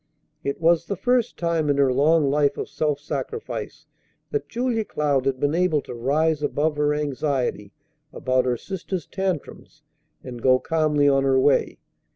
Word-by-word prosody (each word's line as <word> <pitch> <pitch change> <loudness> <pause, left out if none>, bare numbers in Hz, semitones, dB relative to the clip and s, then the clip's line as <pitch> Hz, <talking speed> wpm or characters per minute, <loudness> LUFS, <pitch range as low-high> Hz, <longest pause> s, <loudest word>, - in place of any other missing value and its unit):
It 140 - -3
was 170 0 +3
the 200 - -2
first 245 +3 0
time 165 -3 0
in 140 - +2
her 135 -2 +3
long 150 +3 +3
life 145 +1 +2
of - - -4
self 150 -2 -1
sacrifice 440 - -5 0.5
that 435 - -3
Julia 235 -2 -1
Cloud 145 -8 0
had 130 -1 0
been 145 +2 +1
able 170 -3 +2
to - - -9
rise 150 +6 +1
above 150 +1 0
her 150 0 +2
anxiety 140 -7 -2 0.4
about 130 -1 0
her 125 -1 0
sister's 185 - -5
tantrums 190 -5 -5 0.4
and 120 -2 -8
go 130 +1 +5
calmly 150 0 +1
on 135 -1 +3
her 135 -1 +3
way. 135 +1 +2
150 Hz, 165 wpm, -23 LUFS, 135-165 Hz, 0.5 s, go